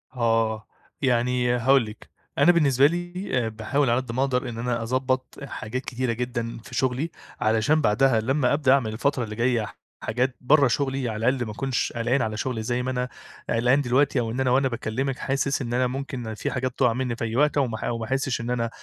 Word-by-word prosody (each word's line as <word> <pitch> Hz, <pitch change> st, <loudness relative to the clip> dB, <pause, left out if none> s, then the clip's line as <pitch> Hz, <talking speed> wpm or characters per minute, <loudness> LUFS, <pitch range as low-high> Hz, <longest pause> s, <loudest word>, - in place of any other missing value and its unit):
آه، 115 Hz, -2 st, +1 dB, 0.3 s
يعني 125 Hz, -1 st, +2 dB
هاقول 130 Hz, +1 st, +4 dB
لِك، 105 Hz, 0 st, -11 dB, 0.3 s
أنا 175 Hz, -, +6 dB
بالنسبة 140 Hz, -6 st, +4 dB
لي 175 Hz, +3 st, -4 dB, 0.2 s
آآ -, -, -1 dB
باحاول 115 Hz, +5 st, 0 dB
على 120 Hz, +2 st, +2 dB
قد 125 Hz, -3 st, -7 dB
ما 125 Hz, +3 st, -1 dB
أقدر 130 Hz, -2 st, 0 dB
إن 115 Hz, -, -7 dB
أنا 120 Hz, 0 st, -1 dB
أضبط 130 Hz, +2 st, -1 dB
حاجات 125 Hz, -1 st, -5 dB
كتيرة 125 Hz, -1 st, -1 dB
جدًا 120 Hz, -1 st, -3 dB
في 125 Hz, -, -9 dB
شغلي؛ 130 Hz, +4 st, 0 dB, 0.3 s
علشان 110 Hz, +8 st, +3 dB
بعدها 115 Hz, +1 st, +3 dB
لما 135 Hz, +3 st, +1 dB
أبدأ 140 Hz, -3 st, +3 dB
أعمل 115 Hz, -6 st, +1 dB
الفترة 130 Hz, +2 st, 0 dB
اللي 110 Hz, -1 st, -6 dB
جاية 120 Hz, -2 st, +1 dB, 0.4 s
حاجات 125 Hz, +3 st, 0 dB
برا 140 Hz, +2 st, +5 dB
شغلي، 135 Hz, -1 st, -1 dB
على 110 Hz, +1 st, -2 dB
الأقل 130 Hz, -2 st, -1 dB
ما 110 Hz, -, -5 dB
اكونش 130 Hz, +4 st, -2 dB
قلقان 120 Hz, +3 st, +1 dB
على 110 Hz, -2 st, -2 dB
شغلي 115 Hz, -2 st, -2 dB
زي 120 Hz, +2 st, -1 dB
ما 130 Hz, -, -1 dB
أنا 125 Hz, 0 st, -2 dB, 0.4 s
قلقان 125 Hz, +5 st, +3 dB
دلوقتي، 130 Hz, +1 st, +2 dB
أو 115 Hz, -2 st, -1 dB
إن 125 Hz, -, -3 dB
أنا 130 Hz, -1 st, +2 dB
وأنا 135 Hz, +1 st, +3 dB
باكلمِك 125 Hz, +2 st, -2 dB
حاسس 140 Hz, +1 st, 0 dB
إن 120 Hz, -2 st, -3 dB
أنا 125 Hz, +1 st, +2 dB
ممكن 130 Hz, -3 st, -5 dB
فيه 110 Hz, -, -3 dB
حاجات 130 Hz, 0 st, -1 dB
تقع 125 Hz, -4 st, +4 dB
مني 125 Hz, -1 st, -2 dB
في -, -, -5 dB
أي 115 Hz, 0 st, -3 dB
وقت، 150 Hz, +3 st, +3 dB
أو 140 Hz, -2 st, +3 dB
ما 110 Hz, -2 st, -4 dB
أو 120 Hz, -, -2 dB
ما 115 Hz, -, -4 dB
احسش 135 Hz, 0 st, -1 dB
إن 115 Hz, -, -4 dB
أنا 115 Hz, -2 st, 0 dB
125 Hz, 215 wpm, -25 LUFS, 115-135 Hz, 0.4 s, أنا